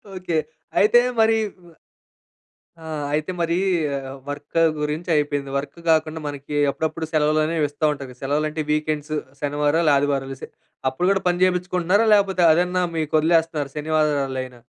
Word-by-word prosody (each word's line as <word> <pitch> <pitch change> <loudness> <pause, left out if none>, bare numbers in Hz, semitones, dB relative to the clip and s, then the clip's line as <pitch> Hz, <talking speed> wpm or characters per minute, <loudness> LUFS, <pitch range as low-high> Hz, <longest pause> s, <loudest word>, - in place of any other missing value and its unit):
Okay. 180 -3 -2 0.4
అయితే 215 +4 +6 0.2
మరి 225 0 +4 1.5
ఆ! - - -11 0.3
అయితే 155 +3 -1
మరీ 170 0 +1 0.7
వర్క 145 +2 -7 0.3
గురించి 150 +4 -3
అయిపోయింది. 145 -2 -1
వర్క్ 140 +4 -4
గాకుండా 160 0 +2
మనకి 145 0 -6 0.2
అప్పుడప్పుడు 160 +2 -3
సెలవులనేవిస్తా 155 0 +1
ఉంటారు. 135 -3 -8
సెలవులంటే, 150 +3 -1
వీకెండ్సు, 155 0 -1 0.2
శనివారాలు, 150 +2 +1
ఆదివారాలు 135 -1 -1
సె - - -6 0.4
అప్పుడు 180 +7 -1
గూడా 195 -2 +1
పని 175 +1 0
చేపించుకుంటున్నారా. 180 +3 +1
లేపోతే 195 -3 +2
అదన్నా 180 +2 +1
మీకొదిలేస్తున్నారు 155 -1 +1
శనివా 155 +1 0
ఆదివారాలైనా? 130 -4 -2
155 Hz, 120 wpm, -22 LUFS, 145-170 Hz, 1.5 s, అయితే